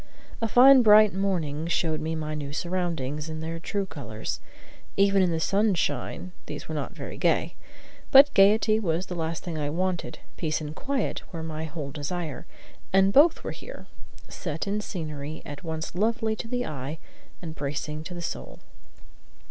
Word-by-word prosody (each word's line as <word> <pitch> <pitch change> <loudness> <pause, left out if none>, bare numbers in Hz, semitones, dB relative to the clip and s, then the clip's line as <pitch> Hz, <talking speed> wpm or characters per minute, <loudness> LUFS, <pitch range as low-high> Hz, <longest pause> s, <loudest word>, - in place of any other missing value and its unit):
A 225 - +1
fine, 260 +4 +8
bright 215 -2 +7
morning 170 -6 -1
showed 160 -3 0
me 160 +1 -2
my 155 -1 -3
new 145 -2 -5
surroundings 165 -4 -2
in 155 0 -5
their 165 +1 -4
true 200 +4 -2
colors; 115 - -5 0.6
even 195 0 +4
in 185 - +3
the 165 -1 0
sunshine 195 -1 0 0.2
these - - -7
were - - -5
not - - -3
very - - -7
gay. - - +2 0.6
But 280 +1 +8
gayety 215 +2 +5
was 175 -3 -1
the 180 - -6
last 165 -1 -3
thing 165 -3 -4
I 145 -1 -1
wanted. 180 +2 -2 0.2
Peace 155 -3 -1
and 155 0 -6
quiet 275 -1 -2
were 165 -3 -5
my 160 0 -4
whole 150 -3 -6
desire, 155 +1 -4 0.4
and 195 +1 +4
both 310 +4 +6
were - - -3
here, - - -10 0.4
set 160 -3 -4
in 205 +1 -1
scenery 155 -6 -6
at 145 +5 -8
once 160 -1 -4
lovely 220 +3 0
to 230 - -5
the 245 +1 -1
eye 140 +2 -5 0.4
and 165 -3 -7
bracing 150 +1 -4
to 180 - -6
the 175 - -6
soul. - - -5
170 Hz, 170 wpm, -27 LUFS, 155-200 Hz, 0.6 s, fine